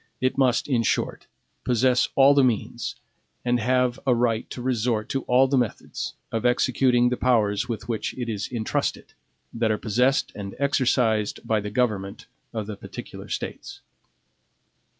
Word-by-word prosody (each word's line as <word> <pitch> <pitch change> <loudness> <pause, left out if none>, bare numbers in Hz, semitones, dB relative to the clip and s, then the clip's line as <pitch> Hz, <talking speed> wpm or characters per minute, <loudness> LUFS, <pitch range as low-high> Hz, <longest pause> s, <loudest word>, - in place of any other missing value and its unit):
It 130 0 +1
must, 130 -3 +2
in 125 -5 +2
short, 115 - -1 0.4
possess 125 0 +2
all 135 +1 +7
the 140 -1 +4
means, 120 -5 -1 0.5
and 120 0 +2
have 125 +1 +1
aright 120 -2 +1
to - - -7
resort 120 -3 -1
to 135 - -1
all 130 +2 +4
the 135 0 +2
methods, 120 -4 -3 0.2
of 115 - -2
executing 125 0 +3
the 125 - -1
powers 110 -2 +1
with 115 -2 -4
which 115 -2 -3
it 120 -2 -3
is 110 -2 -3
intrusted, 115 -3 -2 0.4
that 115 -1 0
are 110 - +1
possessed 125 +6 +1
and 100 -1 -7
exercised 125 -6 +1
by 110 -1 +2
the 105 0 -4
government 105 -3 -1 0.3
of 110 -3 -4
the 105 -1 -6
particular - - -9
States. - - -6
120 Hz, 150 wpm, -25 LUFS, 110-125 Hz, 0.5 s, all